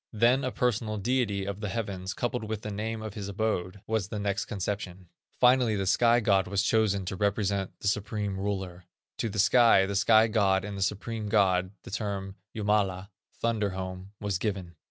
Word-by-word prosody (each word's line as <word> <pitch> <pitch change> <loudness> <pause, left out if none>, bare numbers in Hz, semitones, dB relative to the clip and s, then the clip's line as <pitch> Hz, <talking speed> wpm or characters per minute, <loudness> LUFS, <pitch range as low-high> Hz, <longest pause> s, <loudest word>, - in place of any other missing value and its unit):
Then 120 +5 +3
a 130 - -1
personal 115 -3 0
deity 105 -3 0
of 100 0 -4
the 105 -2 -3
heavens, 95 -3 -4
coupled 120 -1 -2
with 110 0 -4
the 105 - -4
name 110 +2 -4
of 110 -2 -6
his 105 -2 -5
abode, 100 -2 -2
was 110 -4 -1
the 105 - -5
next 100 -2 -1
conception; 95 -2 -4 0.3
finally 125 -3 +5
this 95 -2 +1
sky 120 0 +4
god 100 -4 +2
was 100 0 0
chosen 100 -2 +2
to 95 - -3
represent 100 -1 -1
the - - -2
supreme 105 -1 -1
Ruler. 95 -3 -4 0.3
To 115 - -1
the 105 - -6
sky, 115 -1 +5
the 100 +1 -3
sky 110 +2 +5
god, 100 -4 +2
and 105 -1 -5
the 100 - -5
supreme 105 +2 -2
God, 95 -3 +3
the - - -10
term 100 -2 -3 0.2
Jumala 100 -3 0 0.3
(thunder 110 -3 0
home) 95 +1 -6
was 100 -3 -2
given. 95 -5 -3
100 Hz, 185 wpm, -28 LUFS, 95-110 Hz, 0.3 s, finally